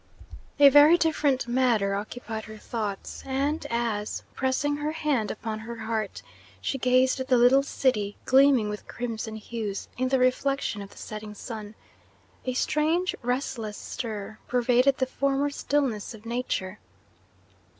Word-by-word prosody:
A 285 -1 +10
very 290 +4 +8
different 295 -6 +1
matter 240 -5 +2
occupied 220 +2 -5
her 215 0 -10
thoughts, 210 -3 -5
and 280 +4 -1
as, 230 -3 -2
pressing 275 +2 0
her 300 +1 -2
hand 290 -9 0
upon 215 0 -4
her 235 +2 -7
heart, 220 -2 -3 0.4
she 270 - -2
gazed 255 +1 +3
at 260 - -3
the 255 - +4
little 245 +3 +6
city, 225 -7 0
gleaming 265 -4 +5
with 210 0 -6
crimson 225 -2 -4
hues 215 -2 -5
in 255 - +2
the 265 +1 +2
reflection 255 -3 +1
of 200 - -8
the - - -18
setting 215 -1 -7
sun, 215 -1 -7 0.7
a 255 - -1
strange, 315 +7 +1
restless 245 -4 -2
stir 215 -2 -6
pervaded 250 +2 +3
the 260 - +1
former 275 +2 0
stillness 270 -7 -1
of 220 +1 -15
Nature. 230 -5 -3
245 Hz, 140 wpm, -27 LUFS, 215-275 Hz, 0.7 s, A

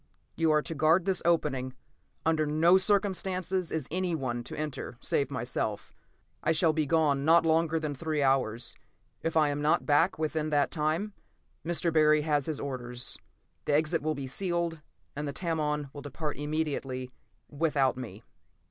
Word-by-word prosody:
"You 165 -1 +2
are 150 -1 +3
to 165 - -4
guard 160 +4 +3
this 190 -2 +1
opening. 135 -6 +1 0.5
Under 160 -1 +2
no 165 +5 +5
circumstances 190 -2 0
is 160 - -2
anyone 155 -10 -2
to - - -7
enter 150 -5 -5
save 140 - 0
myself. 115 -5 -3 0.5
I 160 - +3
shall 160 0 +3
be 155 -2 0
gone 145 -3 +2
not 165 +2 +5
longer 165 0 +2
than 155 -2 -3
three 155 +1 -1
hours; 130 -4 +1 0.5
if 165 0 -1
I 155 -2 +4
am 145 0 -2
not 150 +1 +2
back 160 +5 +3
within 155 0 -1
that 145 -2 +2
time, 165 +7 -1 0.5
Mr. 170 0 +1
Barry 155 -1 +5
has 145 -3 +1
his 155 -3 -2
orders. 125 -3 -3 0.5
The 145 - +2
exit 155 +1 +1
will 155 0 -1
be 140 -1 -5
sealed, 170 +2 -1 0.3
and 150 +1 -3
the 140 - -4
Tamon 150 -4 -2
will 145 - -8
depart 150 +2 -4
immediately, 145 -4 -3 0.4
without 145 -4 +1
me." 115 -4 -8
155 Hz, 160 wpm, -29 LUFS, 140-165 Hz, 0.5 s, no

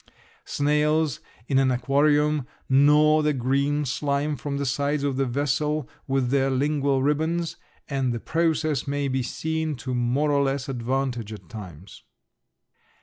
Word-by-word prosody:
Snails 150 0 +1 0.3
in 135 - +3
an 135 -1 +3
aquarium 145 +2 +2 0.2
gnaw 150 +3 +5
the 150 0 +1
green 140 +3 0
slime 140 +3 -1
from 140 +2 -4
the 140 - -2
sides 140 +2 0
of 140 -2 0
the 135 0 0
vessel 145 +3 -1 0.2
with 135 -2 0
their 135 -1 +2
lingual 140 0 +1
ribbons, 160 +4 0 0.3
and 135 -3 -1
the 120 - -3
process 155 -1 0
may 140 0 -1
be 130 0 0
seen 160 +4 -2
to 125 +1 -5
more 125 +5 +1
or 140 -1 +3
less 135 0 -1
advantage 125 -3 -2
at 100 -5 -10
times. 95 -4 -10
140 Hz, 145 wpm, -25 LUFS, 130-150 Hz, 0.3 s, gnaw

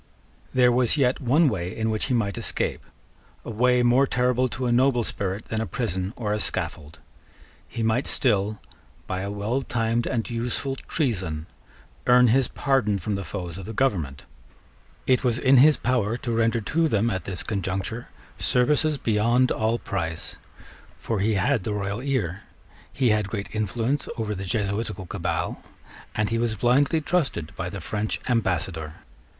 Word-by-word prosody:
There 125 -1 +4
was 125 +3 +3
yet 130 -1 +2
one 145 +6 +4
way 90 -8 -2
in 110 0 0
which 110 - -1
he 130 - 0
might 100 -5 0
escape, - - -2 0.6
a - - -5
way 125 +2 +3
more 125 +3 +4
terrible 125 0 +2
to 130 +2 -4
a 120 - +1
noble 125 0 +3
spirit 100 -1 -3
than 110 0 -1
a 110 - -2
prison 95 -6 -2
or 105 -3 -2
a 105 - -1
scaffold. 75 -6 -4 0.7
He 115 0 -4
might 115 +4 +1
still, 105 -4 +1 0.5
by 95 0 -3
a 100 - -3
well 105 +6 -1
timed 115 -2 0
and 115 -4 -1
useful 120 +3 -2
treason, 95 - -2 0.6
earn 125 0 +6
his 130 +2 +3
pardon 135 -8 +1
from 100 +3 -3
the 100 0 -2
foes 90 0 -6
of 95 - -8
the 110 - -6
government. 80 - 0 0.8
It 130 0 +3
was 120 -3 +2
in 130 +1 +5
his 145 +2 +7
power 120 -3 0
to 120 - -4
render 115 0 +2
to 160 +9 +1
them 115 -3 +1
at 95 -4 -3
this 95 -3 -4
conjuncture 100 +3 -3 0.3
services 150 +4 +2
beyond 120 +2 +2
all 110 +1 +1
price: 80 -6 -4 0.6
for 110 -3 -2
he 105 +2 +2
had 105 +3 +1
the 105 - -2
royal 100 +2 -3
ear; 110 - -1 0.5
he 130 -4 +2
had 105 -2 +1
great 100 -2 -5
influence 115 +6 -1
over 110 -2 -2
the 95 -1 -5
Jesuitical 105 0 -2
cabal; - - -3 0.5
and 105 +1 0
he 115 - +1
was 115 -2 0
blindly 140 - +3
trusted 145 - -1
by - - -3
the - - -6
French 105 0 -2
Ambassador. 90 - -1
115 Hz, 165 wpm, -25 LUFS, 100-125 Hz, 0.8 s, his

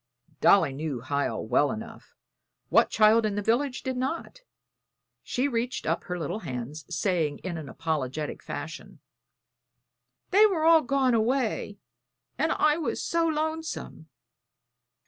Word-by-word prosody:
Dolly 195 -9 +5
knew 140 -3 -4
Hiel 135 -4 -2
well 125 +6 +2
enough 225 +1 -9 0.5
what - - +4
child 220 +1 +5
in 210 -2 -1
the 205 - -1
village 250 +5 0
did 260 0 -2
not? 270 - -4 0.8
She 255 +3 -1
reached 240 -1 -2
up - - -1
her 180 -1 -3
little 170 +6 -3
hands, 130 - -6
saying 170 -3 0
in 185 -2 -4
an 155 -4 -7
apologetic 150 -1 -3
fashion: 165 +4 -7 1.3
"They 420 +3 +7
were 350 -6 -1
all 325 -1 +7
gone 270 -2 +1
away, 230 -2 0 0.6
and 315 +5 0
I 305 0 +3
was 330 - -2
so 335 0 +1
lonesome!" 315 - -3
215 Hz, 130 wpm, -27 LUFS, -, 1.3 s, They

